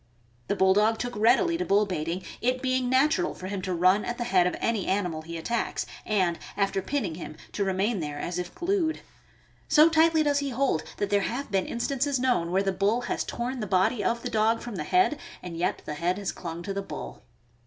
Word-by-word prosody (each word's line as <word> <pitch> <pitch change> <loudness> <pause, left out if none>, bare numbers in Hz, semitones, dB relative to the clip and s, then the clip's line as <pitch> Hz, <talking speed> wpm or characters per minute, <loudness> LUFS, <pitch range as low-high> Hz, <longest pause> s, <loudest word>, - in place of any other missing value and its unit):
The - - 0
Bulldog 205 +4 +4
took 245 +1 -4
readily 335 - +3
to - - +1
bull 205 - +3
baiting, 175 -1 -3 0.2
it 255 +1 +1
being 255 -1 +1
natural 300 +7 +2
for 185 - -9
him 195 0 -3
to 185 - -3
run 185 +4 +3
at 240 - -3
the 240 - -2
head 185 -7 +3
of - - -2
any 225 -5 0
animal 180 -5 0
he 165 +1 -7
attacks, 235 +8 -2 0.2
and 185 -5 +1 0.2
after 195 -1 +1
pinning 210 - -2
him, 155 -2 -8
to 205 - -1
remain 195 +3 0
there 150 -2 -4
as 175 +4 -3
if 175 0 -6
glued. 345 -3 0 0.7
So 310 +2 +6
tightly 320 0 +4
does 290 -1 +2
he 280 -1 -2
hold 255 - +1 0.2
that 205 -1 -2
there 205 0 +3
have 245 +8 -3
been 195 -2 +1
instances 270 +3 -1
known 245 -10 +1
where 190 +2 +2
the 195 - +1
bull 200 +5 +1
has - - -2
torn 250 +2 -4
the 210 - -3
body 200 +4 +2
of 235 0 0
the - - -3
dog 225 +1 +2
from 240 -3 -6
the - - -3
head 365 -5 +3 0.2
and 175 -2 -6
yet 170 +2 -1
the 150 - -4
head 175 +5 -1
has 200 -2 -2
clung 170 -1 -7
to 195 - -3
the 200 - -2
bull. 195 - -8
210 Hz, 220 wpm, -27 LUFS, 185-255 Hz, 0.7 s, So